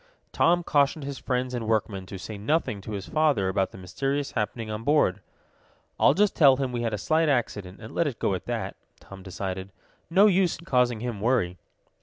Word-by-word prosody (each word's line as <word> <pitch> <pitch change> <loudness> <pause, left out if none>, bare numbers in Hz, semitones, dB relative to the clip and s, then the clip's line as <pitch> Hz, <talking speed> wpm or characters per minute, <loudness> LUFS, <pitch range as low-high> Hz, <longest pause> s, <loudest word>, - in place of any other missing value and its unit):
Tom 175 +1 +3
cautioned 145 0 +2
his 140 -1 -5
friends 125 0 -2
and 115 -3 -3
workmen 105 -4 -1
to 95 - -7
say 105 +3 -7
nothing 105 -1 -1
to 105 - -7
his 100 -2 -5
father 150 -12 +2
about 95 0 0
the - - -13
mysterious 135 +10 -2
happening 110 +1 -3
on 105 +1 -5
board. 130 -9 +2 0.8
"I'll - - +5
just 205 +1 +2
tell 135 -4 +6
him 135 -2 -2
we 120 -1 -2
had 115 -1 -1
a 105 - -2
slight 160 +6 +1
accident, 105 -8 -1
and 110 0 -10
let 170 - +1
it 130 -6 -4
go - - 0
at 95 - -5
that," - - -3 0.2
Tom 100 -1 -12
decided. 95 0 -5 0.4
"No 190 +5 +5
use 190 -4 +3
in 170 - -15
causing 125 -5 +2
him 120 -5 -4
worry." 105 -7 +1
120 Hz, 205 wpm, -26 LUFS, 100-145 Hz, 0.8 s, tell